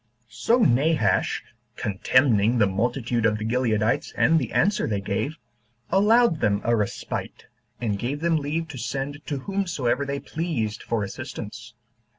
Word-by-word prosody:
2. -, -, -41 dB
So 120 Hz, -, +1 dB
Nabash, 140 Hz, -, +2 dB, 0.3 s
contemning 115 Hz, +2 st, +2 dB
the 110 Hz, -, +5 dB
multitude 120 Hz, +4 st, -1 dB
of 105 Hz, -2 st, +2 dB
the 110 Hz, -, -4 dB
Gileadites 115 Hz, -2 st, 0 dB
and 160 Hz, +1 st, +4 dB
the 125 Hz, -, -4 dB
answer 200 Hz, +4 st, +2 dB
they 105 Hz, -2 st, -1 dB
gave, 100 Hz, +11 st, -2 dB, 0.5 s
allowed 210 Hz, -2 st, +4 dB
them 100 Hz, -1 st, +2 dB
a 120 Hz, -, +2 dB
respite, 105 Hz, -3 st, -4 dB, 0.3 s
and 105 Hz, -4 st, -1 dB
gave 135 Hz, +6 st, -2 dB
them 165 Hz, 0 st, +2 dB
leave 155 Hz, +3 st, -2 dB
to 140 Hz, -5 st, -7 dB
send 140 Hz, +3 st, -4 dB
to 145 Hz, -, -2 dB
whomsoever 160 Hz, -9 st, -1 dB
they 140 Hz, 0 st, -3 dB
pleased 130 Hz, -12 st, -3 dB
for 115 Hz, -3 st, -1 dB
assistance. 100 Hz, -, -7 dB
125 Hz, 150 wpm, -25 LUFS, 110-155 Hz, 0.5 s, the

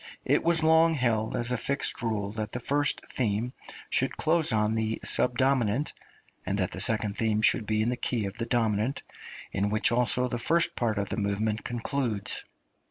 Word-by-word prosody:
It -, -, +2 dB
was 165 Hz, -1 st, +2 dB
long 160 Hz, +1 st, +5 dB
held 115 Hz, -5 st, 0 dB
as 120 Hz, +1 st, -2 dB
a 125 Hz, -, +1 dB
fixed 140 Hz, +4 st, -1 dB
rule 105 Hz, -4 st, -2 dB
that 110 Hz, -1 st, -5 dB
the 125 Hz, -, -2 dB
first 145 Hz, +4 st, 0 dB
theme 115 Hz, +1 st, -2 dB, 0.4 s
should -, -, 0 dB
close 160 Hz, 0 st, +2 dB
on 105 Hz, 0 st, +1 dB
the 110 Hz, 0 st, -1 dB
subdominant, 125 Hz, 0 st, +2 dB, 0.5 s
and -, -, -2 dB
that -, -, 0 dB
the -, -, -6 dB
second 110 Hz, -2 st, +2 dB
theme 110 Hz, -1 st, +1 dB
should 110 Hz, 0 st, +3 dB
be 110 Hz, 0 st, +1 dB
in 115 Hz, -, 0 dB
the 125 Hz, -, 0 dB
key 120 Hz, -4 st, -1 dB
of 100 Hz, +3 st, -7 dB
the 115 Hz, -, -2 dB
dominant, 115 Hz, +2 st, 0 dB, 0.5 s
in 100 Hz, +1 st, 0 dB
which 110 Hz, +3 st, +3 dB
also 125 Hz, +1 st, +1 dB
the 120 Hz, -1 st, -3 dB
first 170 Hz, +6 st, +1 dB
part 115 Hz, -3 st, -1 dB
of 100 Hz, -1 st, -2 dB
the -, -, -3 dB
movement 105 Hz, +1 st, -1 dB
concludes. 120 Hz, -3 st, -2 dB
115 Hz, 185 wpm, -28 LUFS, 110-130 Hz, 0.5 s, long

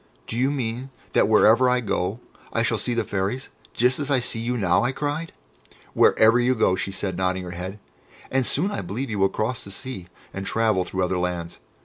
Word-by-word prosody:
"Do -, -, -6 dB
you 130 Hz, +3 st, +2 dB
mean 130 Hz, -2 st, -3 dB, 0.2 s
that -, -, +4 dB
wherever 110 Hz, +3 st, +5 dB
I 125 Hz, 0 st, +3 dB
go 105 Hz, 0 st, -2 dB, 0.3 s
I 115 Hz, -, +1 dB
shall 115 Hz, -1 st, 0 dB
see 120 Hz, +3 st, -1 dB
the 115 Hz, -, +1 dB
Fairies, 100 Hz, +6 st, -2 dB, 0.3 s
just 125 Hz, +3 st, +2 dB
as 145 Hz, -1 st, -3 dB
I 140 Hz, -2 st, +4 dB
see 115 Hz, -2 st, -3 dB
you 120 Hz, +2 st, -1 dB
now?" 95 Hz, -3 st, +2 dB
I 120 Hz, -, +1 dB
cried. 150 Hz, +4 st, -3 dB, 0.6 s
"Wherever 115 Hz, +2 st, +5 dB
you 125 Hz, +1 st, +2 dB
go!" 95 Hz, -5 st, +3 dB
she 95 Hz, +1 st, -3 dB
said, 95 Hz, -1 st, -3 dB
nodding 95 Hz, 0 st, -1 dB
her 90 Hz, -, -6 dB
head, 90 Hz, +3 st, -6 dB, 0.5 s
"and 135 Hz, 0 st, +2 dB
soon 185 Hz, +8 st, +1 dB
I -, -, -3 dB
believe 110 Hz, +8 st, -4 dB
you 105 Hz, -, -2 dB
will 95 Hz, 0 st, +4 dB
cross 115 Hz, +5 st, -2 dB
the -, -, -9 dB
sea 100 Hz, -3 st, -6 dB, 0.3 s
and 95 Hz, -, -4 dB
travel 110 Hz, -3 st, +1 dB
through 95 Hz, 0 st, -2 dB
other 90 Hz, 0 st, 0 dB
lands. 90 Hz, -1 st, -3 dB
110 Hz, 215 wpm, -24 LUFS, 95-125 Hz, 0.6 s, wherever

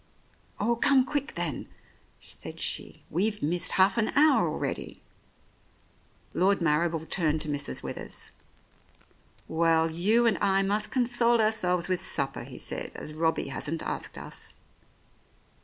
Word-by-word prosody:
"Oh, 235 Hz, +3 st, +1 dB
come 265 Hz, +1 st, +4 dB
quick, 285 Hz, 0 st, -3 dB
then," 170 Hz, -5 st, -3 dB, 0.5 s
said -, -, -7 dB
she. -, -, -2 dB
"We've 205 Hz, +4 st, 0 dB
missed 170 Hz, +4 st, +1 dB
half 190 Hz, +4 st, +4 dB
an 220 Hz, -, +2 dB
hour 305 Hz, +1 st, +5 dB
already." -, -, -4 dB, 1.3 s
Lord 195 Hz, +2 st, +3 dB
Marrible 165 Hz, 0 st, +1 dB
turned 155 Hz, -4 st, +1 dB
to 155 Hz, -, -1 dB
Mrs. 145 Hz, -1 st, -1 dB
Withers. -, -, -6 dB, 1.2 s
"Well, 165 Hz, 0 st, +2 dB
you 210 Hz, +9 st, +3 dB
and 225 Hz, -3 st, +2 dB
I 195 Hz, -1 st, +3 dB
must 205 Hz, +2 st, 0 dB
console 240 Hz, -2 st, +2 dB
ourselves 185 Hz, -5 st, +1 dB
with 185 Hz, -1 st, -1 dB
supper," 135 Hz, -1 st, -1 dB
he -, -, -10 dB
said, -, -, -4 dB
"as 150 Hz, -, -7 dB
Robbie 160 Hz, -2 st, 0 dB
hasn't 150 Hz, +4 st, -4 dB
asked -, -, -5 dB
us." -, -, -6 dB
185 Hz, 130 wpm, -28 LUFS, 160-220 Hz, 1.3 s, hour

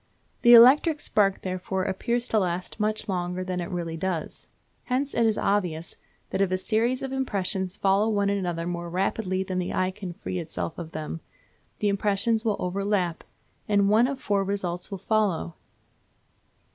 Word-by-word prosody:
The 240 Hz, 0 st, +9 dB
electric 290 Hz, +6 st, +7 dB
spark, 200 Hz, -8 st, +1 dB
therefore, 185 Hz, 0 st, -2 dB
appears 235 Hz, +6 st, -1 dB
to 220 Hz, -, +3 dB
last 180 Hz, +2 st, -3 dB
much 215 Hz, +1 st, -1 dB
longer 180 Hz, -1 st, -2 dB
than 185 Hz, -1 st, -3 dB
it 175 Hz, -, -5 dB
really 170 Hz, -3 st, -4 dB
does. 170 Hz, -2 st, -4 dB, 0.4 s
Hence 270 Hz, +2 st, -1 dB
it 230 Hz, -1 st, +3 dB
is 220 Hz, -, +1 dB
obvious 175 Hz, -5 st, -1 dB, 0.4 s
that 190 Hz, -, 0 dB
if 195 Hz, -2 st, +2 dB
a 185 Hz, -, +2 dB
series 230 Hz, +6 st, 0 dB
of 270 Hz, -, -4 dB
impressions 195 Hz, -7 st, -2 dB
follow 200 Hz, +3 st, +2 dB
one 205 Hz, -2 st, +1 dB
another 175 Hz, -4 st, -2 dB
more 175 Hz, 0 st, -4 dB
rapidly 190 Hz, +1 st, -1 dB
than 185 Hz, -1 st, -3 dB
the 180 Hz, -, -3 dB
eye 185 Hz, 0 st, +1 dB
can 190 Hz, -2 st, -7 dB
free 185 Hz, +1 st, -5 dB
itself 165 Hz, 0 st, -5 dB
of 165 Hz, -2 st, -7 dB
them, 155 Hz, +1 st, -5 dB, 0.6 s
the 210 Hz, -, 0 dB
impressions 205 Hz, +3 st, +1 dB
will 215 Hz, -3 st, 0 dB
overlap, 185 Hz, -2 st, -1 dB, 0.5 s
and 200 Hz, -1 st, +3 dB
one 225 Hz, +4 st, +5 dB
of 270 Hz, -1 st, -4 dB
four 200 Hz, -5 st, 0 dB
results 185 Hz, -3 st, -3 dB
will 195 Hz, -, -5 dB
follow. 195 Hz, -, 0 dB
195 Hz, 170 wpm, -26 LUFS, 180-215 Hz, 0.6 s, The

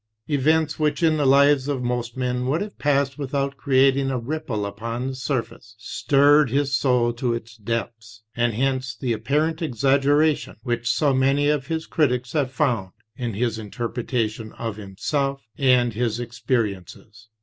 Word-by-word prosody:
Events 155 Hz, +2 st, +1 dB
which 150 Hz, +1 st, 0 dB
in 160 Hz, -1 st, +4 dB
the 145 Hz, -2 st, +2 dB
lives 140 Hz, 0 st, +5 dB
of 135 Hz, -3 st, -2 dB
most 120 Hz, -1 st, -3 dB
men 125 Hz, 0 st, -1 dB
would 150 Hz, +6 st, 0 dB
have 205 Hz, 0 st, -6 dB
passed 140 Hz, -1 st, +1 dB
without 140 Hz, 0 st, -2 dB
creating 135 Hz, 0 st, +3 dB
a 130 Hz, -, -1 dB
ripple 120 Hz, -4 st, -3 dB
upon 115 Hz, +5 st, -4 dB
the 135 Hz, -, -3 dB
surface, 115 Hz, -4 st, -4 dB
stirred 145 Hz, +5 st, +3 dB
his 140 Hz, +1 st, +1 dB
soul 125 Hz, -3 st, +2 dB
to 120 Hz, 0 st, -1 dB
its 115 Hz, -1 st, -8 dB
depths; 115 Hz, 0 st, -5 dB
and 120 Hz, -2 st, +1 dB
hence 130 Hz, +1 st, -1 dB
the 125 Hz, -4 st, -2 dB
apparent 150 Hz, +9 st, 0 dB
exaggeration 145 Hz, +2 st, +2 dB
which 120 Hz, -1 st, -1 dB
so 145 Hz, +2 st, +2 dB
many 135 Hz, +2 st, +2 dB
of 145 Hz, -3 st, 0 dB
his 160 Hz, 0 st, -2 dB
critics 125 Hz, -5 st, 0 dB
have 145 Hz, -4 st, +1 dB
found 120 Hz, -10 st, -1 dB, 0.2 s
in 120 Hz, -5 st, -4 dB
his 115 Hz, 0 st, -1 dB
interpretation 115 Hz, 0 st, -3 dB
of 115 Hz, -3 st, -5 dB
himself 135 Hz, +8 st, -2 dB
and 125 Hz, -4 st, +3 dB
his 115 Hz, 0 st, -1 dB
experiences. 110 Hz, -2 st, -4 dB
130 Hz, 155 wpm, -23 LUFS, 115-140 Hz, 0.2 s, lives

